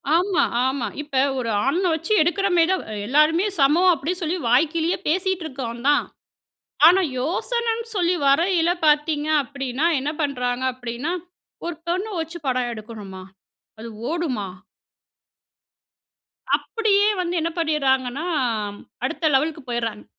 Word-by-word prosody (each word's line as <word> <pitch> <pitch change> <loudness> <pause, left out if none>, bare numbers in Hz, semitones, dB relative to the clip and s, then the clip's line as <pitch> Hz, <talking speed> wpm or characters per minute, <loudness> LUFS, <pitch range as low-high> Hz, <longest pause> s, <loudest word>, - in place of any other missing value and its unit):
ஆமா. 365 +1 +2 0.2
ஆமா. 260 -4 -1
இப்ப 275 -3 0 0.2
ஒரு 230 -2 -2 0.2
ஆண் 280 +6 +1
அ - - +2
வச்சு 325 +6 -1
எடுக்கிறமேரி 355 0 +2
தான் 375 - 0 0.2
எல்லாருமே 305 - +3
சமம் 325 +7 +5
அப்பிடி 315 +3 -2
சொல்லி 340 +3 -1
வாய்க்கிழிய 320 +6 +2
பேசிட்டு 370 +2 0
இருக்கோம் 245 -5 -6
தான். 290 - +4 0.8
ஆனா, 370 +3 +6 0.2
யோசனன்னு 460 - -1
சொல்லி 355 -1 +2
வரயில 335 +4 +3 0.2
பார்த்தீங்க 300 0 +2
அப்பிடின்னா, 275 +2 -2
என்ன 290 +3 -2
பண்றாங்க 250 -3 -1
அப்பிடின்னா 245 +5 -4 0.5
ஒரு 345 - -3
பெண்ண 365 +4 0
வச்சு 325 +1 -5
படம் 250 -1 0
எடுக்கணுமா? 210 -4 -9 0.6
அது 230 +1 -7 0.2
ஓடுமா? 270 - -2 2.1
அப்பிடியே 415 -3 +1
வந்து 350 0 -2
என்ன 330 - 0
பண்ணிறாங்கன்னா, 275 -2 0 0.8
அடுத்த 320 - 0
லெவலுக்கு 305 +2 +1
போயிறாங்க. 230 -3 -3
305 Hz, 120 wpm, -22 LUFS, 255-345 Hz, 2.1 s, ஆனா